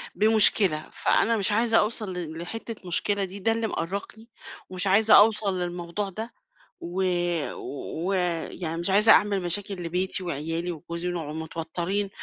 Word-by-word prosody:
بمُشكلة، 205 -5 +4
فأنا 230 0 +2
مش 200 0 +1
عايزة 225 +1 +3
أوصل 215 -3 -2
ل 165 -3 -6
لحِتَّة 215 +2 -7
مُشكلة 200 +3 0
دي، 195 +2 -6
ده 225 +4 +1
اللي 225 0 -1
مأرّقني، 200 +6 -5 0.4
ومش 185 +1 -2
عايزة 215 +3 +5
أوصل 205 -3 +3
للموضوع 175 +3 -3
ده، 220 +5 -7 0.5
و 180 +3 -3 1.0
و 195 - 0 0.4
يعني 165 -2 -4
مش 175 - -1
عايزة 210 +3 +5
أعمل 200 -2 +4
مشاكل 195 +3 -1
لبيتي 185 +3 -1
وعيالي 165 +2 -3
وجوزي، 170 +2 -6
ونقعُد 160 -4 -4
مِتوَتِّرين، 170 +5 -3
190 Hz, 140 wpm, -26 LUFS, 170-210 Hz, 1.0 s, عايزة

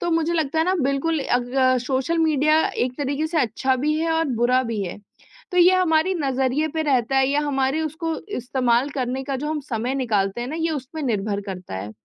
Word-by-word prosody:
तो 345 - -1
मुझे 330 +1 +1
लगता 320 -1 0
है 320 - +3
ना 375 - +2
बिल्कुल 275 +4 0
अग 255 0 +1
सोशल 270 +6 0
मीडिया 310 0 +3
एक 250 0 -1
तरीके 285 +2 -1
से 320 0 -1
अच्छा 260 +2 0
भी 300 +4 0
है, 325 0 0
और 325 0 +1
बुरा 250 +2 +3
भी 230 -4 -3
है। 180 - -5 0.6
तो 360 - +1
ये 360 +1 +7
हमारी 360 0 +2
नज़रिए 270 +1 0
पे 315 +1 -2
रहता 270 -3 +1
है 265 - +4
या 285 +1 +2
हमारे 275 0 0
उसको 320 +1 -3 0.2
इस्तेमाल 250 +1 +1
करने 260 -1 -2
का 275 0 -2
जो 285 +3 -4
हम 310 -1 -2
समय 240 +4 -1
निकालते 210 -5 0
हैं 245 - -4
ना 315 - -4
ये 325 0 0
उसपे 295 +1 -5
निर्भर 210 -4 -1
करता 185 - -7
है 100 +2 -6
270 Hz, 215 wpm, -23 LUFS, 250-315 Hz, 0.6 s, ये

